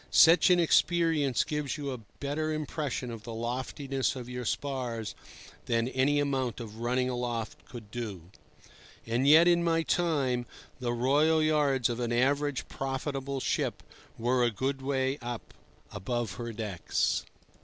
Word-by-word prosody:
Such 165 +3 +7
an 180 -1 +5
experience 165 -5 +3
gives 150 -1 -3
you 140 -2 -3
a 130 - -5 0.2
better 150 +2 -1
impression 150 -4 -3
of 115 -2 -7
the 115 0 -7
loftiness 130 +3 -2
of 125 -2 -7
your 125 0 -5
spars 125 -5 -2 0.5
than 115 0 +1
any 135 +3 +2
amount 130 -5 -1
of 110 -2 -8
running 125 +2 +1
aloft 120 -3 -3
could 110 -4 -11
do. 110 -8 -5 0.8
And 120 +4 +1
yet 160 +4 +8
in 170 -1 +4
my 165 -1 +2
time 140 -9 0 0.3
the 125 -2 -1
royal 145 +7 +3
yards 145 -5 +2
of 120 0 -3
an 120 -1 -1
average 140 +3 +1
profitable 135 0 -3
ship - - -1 0.3
were 125 +2 +2
a 120 - +4
good 135 +5 -2
way 135 +1 0
up 120 -1 -6 0.4
above 120 +1 -2
her 120 +3 -5
decks. 105 -6 -1
130 Hz, 145 wpm, -29 LUFS, 120-145 Hz, 0.8 s, yet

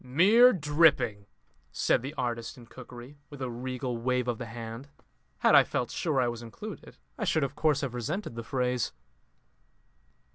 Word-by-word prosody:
"Mere 200 - +6
dripping!" 145 - +2 0.4
said - - +1
the 135 +5 -6
artist 120 -3 -3
in 120 - -13
cookery, 125 +3 -12
with 145 - -11
a 130 -2 -3
regal 125 0 -4
wave 125 +1 0
of 120 -2 -2
the 120 - -5
hand. 115 +3 -8 0.5
Had - - +4
I - - +9
felt 125 - -3
sure 155 -6 0
I 125 - +2
was 120 -1 -4
included, 195 - -9 0.2
I - - -2
should 170 -6 +1
of 135 0 -2
course 150 -3 +2
have 135 -4 -3
resented 145 - -4
the 115 - -5
phrase. 125 0 -1
125 Hz, 170 wpm, -29 LUFS, 120-150 Hz, 0.5 s, I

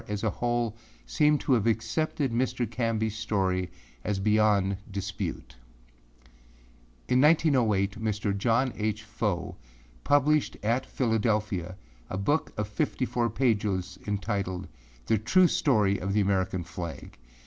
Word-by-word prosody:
as 105 0 -4
a 110 - +1
whole, 120 -2 -1 0.3
seem 150 - +3
to 140 - 0
have 115 -3 +2
accepted 140 +5 0
Mr. 125 +1 0
Canbyâs 115 -2 -1
story 95 -4 -1 0.3
as 105 -2 -1
beyond 105 -1 +3
dispute. 100 -10 -5 1.5
In 125 0 +3
1908, 120 -10 +3
Mr. 105 -2 -1
John 115 +5 +1
H. 110 0 -2
Fow 105 -4 -3 0.5
published 145 +1 +2
at 120 +5 0
Philadelphia 105 -6 0 0.3
a 95 - -3
book 145 +11 0
of 105 -1 -1
fifty 105 +4 -1
four 120 -1 0
pages 105 -6 0
entitled 100 -3 -2 0.4
âThe 110 -1 +1
True 185 +10 +5
Story 105 -12 +2
of 95 +2 -2
the 105 - +3
American 95 -2 0
Flag. 85 -6 -8
110 Hz, 125 wpm, -28 LUFS, 100-120 Hz, 1.5 s, True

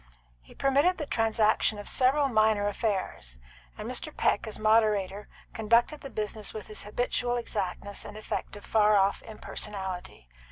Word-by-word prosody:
He - - -18
permitted 285 +7 +3
the 300 - -3
transaction 220 -3 +2
of 205 - -7
several 275 +3 +3
minor 215 -4 +3
affairs, 195 - -2 0.4
and - - -6
Mr. - - -2
Peck, - - +1
as 215 - -5
Moderator, 210 -2 +2 0.3
conducted 235 +7 +2
the 275 - -7
business 215 -1 -4
with 215 - -6
his 215 - -7
habitual 245 +2 -1
exactness 200 -3 -3
and 210 - -9
effect 215 - -4
of 205 - -11
far 215 -1 +4
off 195 0 +3
impersonality. 190 - -6
215 Hz, 150 wpm, -28 LUFS, 205-235 Hz, 0.4 s, far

